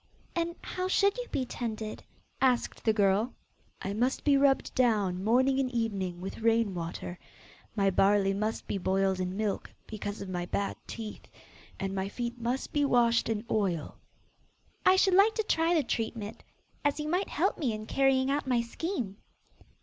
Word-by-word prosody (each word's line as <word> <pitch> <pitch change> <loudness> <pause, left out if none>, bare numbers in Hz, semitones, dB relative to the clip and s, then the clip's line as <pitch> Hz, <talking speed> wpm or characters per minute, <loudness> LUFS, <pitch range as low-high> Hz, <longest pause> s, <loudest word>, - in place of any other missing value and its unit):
'And 340 0 -1
how 365 0 -3
should 400 +1 +3
you - - -4
be 260 - -1
tended?' 220 -3 -5 0.4
asked 255 -2 +1
the 220 - +5
girl. 205 +3 +2 0.5
'I 195 - -2
must 245 +5 0
be 290 -2 +4
rubbed 275 -1 +3
down 205 -7 +2
morning 260 +5 +3
and 265 -2 +1
evening 200 -7 -2
with 190 - -6
rain 225 -2 +2
water, 175 +1 -5 0.6
my 195 -2 +3
barley 195 +1 +3
must 215 +3 -2
be 200 - -2
boiled 190 0 +1
in 185 +1 -2
milk, 210 -2 -2
because 205 -1 -5
of 200 - -6
my 175 -1 -3
bad 200 +2 -1
teeth, 220 -2 -7 0.5
and 195 0 -2
my 195 0 -2
feet 240 +2 -4
must 245 +3 -2
be 290 - +2
washed 235 -4 +3
in 220 0 -2
oil.' 185 -7 0 0.9
'I 370 - +8
should 380 0 +4
like 400 +4 +5
to 440 - +1
try 330 -4 +2
the 310 - +3
treatment, 225 -3 -3 0.4
as 290 +1 +1
you 300 - -2
might 360 +5 0
help - - 0
me 270 -8 +1
in 215 0 -5
carrying 270 +2 +2
out 285 -1 -1
my 250 -2 +3
scheme. 235 - -4
230 Hz, 175 wpm, -30 LUFS, 195-270 Hz, 0.9 s, I